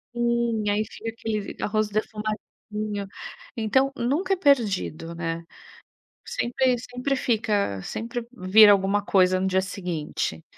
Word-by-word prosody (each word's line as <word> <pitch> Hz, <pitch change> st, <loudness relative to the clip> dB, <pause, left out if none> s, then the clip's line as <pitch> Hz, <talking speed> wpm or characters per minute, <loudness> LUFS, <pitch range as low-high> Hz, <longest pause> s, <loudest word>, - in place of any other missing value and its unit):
Sim. 235 Hz, -2 st, +1 dB
Aí 205 Hz, +1 st, +2 dB
fica 225 Hz, 0 st, -7 dB
aquele 225 Hz, -1 st, -3 dB
v 200 Hz, -, -8 dB
arroz 215 Hz, 0 st, 0 dB
defumadinho. 210 Hz, -1 st, -4 dB, 0.5 s
Então, 265 Hz, +4 st, +2 dB
nunca 295 Hz, +12 st, 0 dB
é -, -, +3 dB
perdido, 205 Hz, -, +1 dB
né. 165 Hz, 0 st, -3 dB, 0.8 s
Sempre 250 Hz, +1 st, +1 dB
sempre 250 Hz, +3 st, -2 dB
fica 210 Hz, -, 0 dB
sempre 230 Hz, -, -4 dB
vira 205 Hz, -1 st, +7 dB
alguma 200 Hz, +1 st, +2 dB
coisa 185 Hz, -2 st, +3 dB
no 190 Hz, -, 0 dB
dia 190 Hz, 0 st, +2 dB
seguinte. 170 Hz, -, -3 dB
215 Hz, 125 wpm, -25 LUFS, 190-235 Hz, 0.8 s, vira